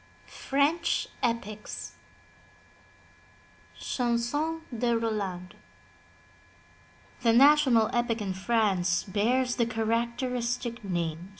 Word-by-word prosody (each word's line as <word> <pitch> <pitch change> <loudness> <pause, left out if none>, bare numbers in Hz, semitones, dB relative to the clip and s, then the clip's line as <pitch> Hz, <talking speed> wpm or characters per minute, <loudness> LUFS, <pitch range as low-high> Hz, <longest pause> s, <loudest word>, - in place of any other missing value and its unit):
^FRENCH 280 - 0 0.2
EPICS 215 -3 -3 1.9
CHANSON 255 +7 -1
DE 235 0 +1
ROLAND 200 -5 -3 1.7
The 235 -2 +4
national 265 -3 +5
epic 240 -1 0
in 200 -3 -3
France 190 -4 +1
bears 240 +5 0
the 235 -2 +2
characteristic 235 +1 -2
name. 175 -2 -3
235 Hz, 75 wpm, -28 LUFS, 205-245 Hz, 1.9 s, national